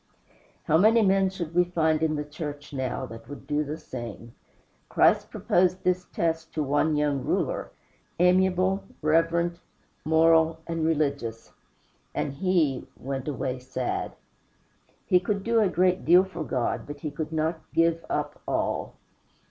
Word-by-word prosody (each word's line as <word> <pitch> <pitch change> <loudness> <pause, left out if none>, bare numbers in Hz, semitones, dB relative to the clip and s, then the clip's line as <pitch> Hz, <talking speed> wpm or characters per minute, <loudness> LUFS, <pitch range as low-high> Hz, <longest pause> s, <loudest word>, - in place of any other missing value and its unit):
How 160 - +3
many 220 +3 +5
men 195 -1 +3
should 170 -4 -6
we 180 +1 +5
find 160 -3 +1
in 160 -1 +1
the 150 0 -3
church 145 -1 -7
now 130 -1 -2
that 115 -2 -11
would 145 -1 -9
do 150 +1 0
the 150 +2 -5
same? 120 -4 -8 0.6
Christ - - +3
proposed 185 +1 +1
this 180 0 +1
test 165 -1 -1
to 155 - 0
one 145 +2 +1
young 145 -3 0
ruler, - - -1 0.5
amiable, 185 +2 +3 0.2
reverent, 165 +2 +2 0.4
moral, 160 0 +4
and 165 -1 -2
religious, 140 -8 -1 0.6
and 140 - -2
he 155 -5 +1
"went 135 0 -5
away 130 -2 -2
sad." 125 0 -3 0.9
He 180 - +4
could 195 +2 -2
do 230 +1 +2
a 210 -3 +3
great 180 +1 +2
deal 175 +3 +6
for 185 -4 -6
God, 125 -5 -2
but 145 -1 -8
he 150 - -4
could 155 +1 -5
not 160 +1 -1
give 165 0 +2
up - - -3
ALL. - - -1
160 Hz, 150 wpm, -26 LUFS, 145-180 Hz, 0.9 s, deal